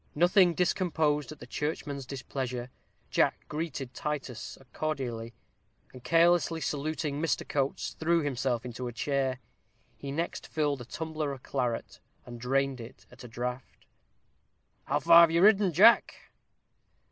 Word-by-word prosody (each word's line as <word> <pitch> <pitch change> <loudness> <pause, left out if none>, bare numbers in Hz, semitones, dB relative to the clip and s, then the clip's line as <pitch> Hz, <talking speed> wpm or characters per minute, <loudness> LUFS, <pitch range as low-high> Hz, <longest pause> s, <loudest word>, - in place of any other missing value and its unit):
Nothing 175 +2 +4
discomposed 155 -5 0
at 155 - -9
the - - -11
churchman's 145 -3 -4
displeasure, 130 -2 -5 0.4
Jack - - +1
greeted 150 -5 -4
Titus 135 -4 -5 0.2
cordially, 120 -7 -3 0.6
and 125 -2 -12
carelessly 165 +3 +3
saluting 150 0 -2
Mr. 165 - -1
Coates, 140 -1 -2
threw 170 +1 +2
himself 125 -4 -1
into 125 +1 -5
a - - -4
chair. 130 +1 -1 0.6
He 140 - -7
next 165 +4 -3
filled 145 -4 -1
a - - -8
tumbler 155 +1 -4
of 135 -2 -8
claret, 125 -4 -3 0.3
and 120 -1 -10
drained 135 0 0
it 120 +3 -12
at - - -14
a - - -8
draught. 125 +2 -6 1.0
"Have 165 +4 +6
you 170 +2 +2
ridden 205 -1 +6
far, 165 - -8
Jack?" 215 +7 +6
140 Hz, 135 wpm, -29 LUFS, 125-160 Hz, 1.0 s, Have